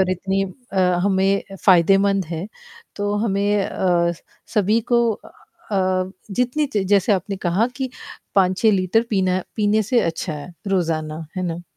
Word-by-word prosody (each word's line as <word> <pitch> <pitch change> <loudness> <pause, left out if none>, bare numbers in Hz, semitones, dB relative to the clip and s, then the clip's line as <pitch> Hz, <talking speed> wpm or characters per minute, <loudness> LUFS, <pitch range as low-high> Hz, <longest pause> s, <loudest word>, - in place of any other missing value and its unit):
और 185 -1 +2
इतनी 190 +2 -1 0.3
अ, 190 - -1 0.3
हमें 195 0 +2 0.2
फायदेमंद 195 +2 +4
है 165 +3 -4 0.5
तो 205 0 -1
हमें 200 -1 +1
अ, 170 -2 +1
स 165 - -15 0.3
सभी 210 +2 +3
को 235 - +5
अ, 190 - -3 0.2
जितनी 250 +8 0
च 210 - +3 0.2
जैसे 200 +2 +3
आपने 195 +1 -1
कहा 185 +4 +1
कि 260 -2 -3 0.4
5-6 195 +3 +3
लीटर 190 +3 +2
पीना 185 -3 +1
पीने 215 0 +2
से 235 +4 +2
अच्छा 165 0 -2
है 150 +4 -8 0.2
रोज़ाना, 160 -4 -1
है 185 - -1
ना? 170 +1 -4
195 Hz, 150 wpm, -21 LUFS, 180-205 Hz, 0.5 s, को